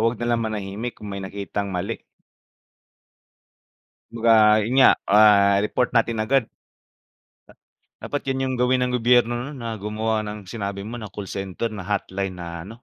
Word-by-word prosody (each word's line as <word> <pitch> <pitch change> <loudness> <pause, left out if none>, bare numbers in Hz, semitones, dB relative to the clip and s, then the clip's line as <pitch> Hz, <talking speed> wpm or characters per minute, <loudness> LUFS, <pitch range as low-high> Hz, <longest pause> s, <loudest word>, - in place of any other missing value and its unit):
huwag 115 +1 +1
na 120 - -3
lang 115 - -1
manahimik 110 +2 -4
kung 105 - -9
may 100 0 -5
nakitang 100 +1 -4
mali. 95 +5 -4 2.1
Kumbaga, 115 0 +2 0.3
'yun 110 +4 -3
nga, 130 - +8 0.2
ah, 100 -1 +6
report 125 +3 0
natin 115 0 +2
agad. 135 +2 +3 1.6
Dapat 145 -1 -4
'yan 135 0 -1
'yung 130 0 -1
gawin 125 +1 +2
ng 125 0 0
gobyerno 120 0 +4
nun 130 0 -7
na 115 -2 -4
gumawa 110 +1 -2
ng 105 0 -6
sinabi 100 -3 -4
mo 115 +4 -7
na 110 - -7
call 100 0 -8
center 95 +3 -4
na 100 -4 -7
hotline 95 -2 -2
na 85 -1 -7
ano, 115 +4 -12
110 Hz, 160 wpm, -23 LUFS, 100-120 Hz, 2.1 s, nga